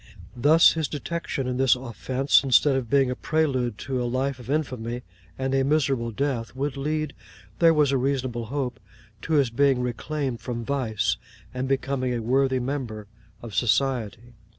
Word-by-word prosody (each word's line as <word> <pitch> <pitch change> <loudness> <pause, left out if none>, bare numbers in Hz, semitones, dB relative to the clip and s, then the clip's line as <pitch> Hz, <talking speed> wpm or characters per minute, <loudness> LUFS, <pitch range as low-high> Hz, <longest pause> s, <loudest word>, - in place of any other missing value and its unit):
Thus, 150 +7 +6
his 160 -2 -1
detection 150 -2 -4
in 125 0 -2
this 130 0 +4
offence, 130 +3 +1
instead 135 +1 +4
of 130 -4 -2
being 135 -2 +3
the 125 - -2
prelude 130 -9 0
to 130 -2 -1
a - - -1
life 130 +2 -1
of 125 0 -11
infamy 125 -5 -2 0.3
and 130 0 -2
a 135 0 +3
miserable 135 -4 +1
death, 120 0 -2
would 140 +1 -2
lead, 150 +1 -2 0.5
there 165 -1 +6
was 150 -3 +3
a 135 - +2
reasonable 130 -3 -1
hope, 125 -3 -3 0.4
to 160 - -3
his 140 -6 +3
being 135 +1 +3
reclaimed 125 +1 -3
from 120 -2 -4
vice, 110 - 0 0.4
and 130 +1 -2
becoming 135 -2 -1
a - - -1
worthy 130 +2 +2
member 125 -5 -4 0.4
of 115 -3 -8
society. 120 -1 0
130 Hz, 165 wpm, -25 LUFS, 120-140 Hz, 0.5 s, Thus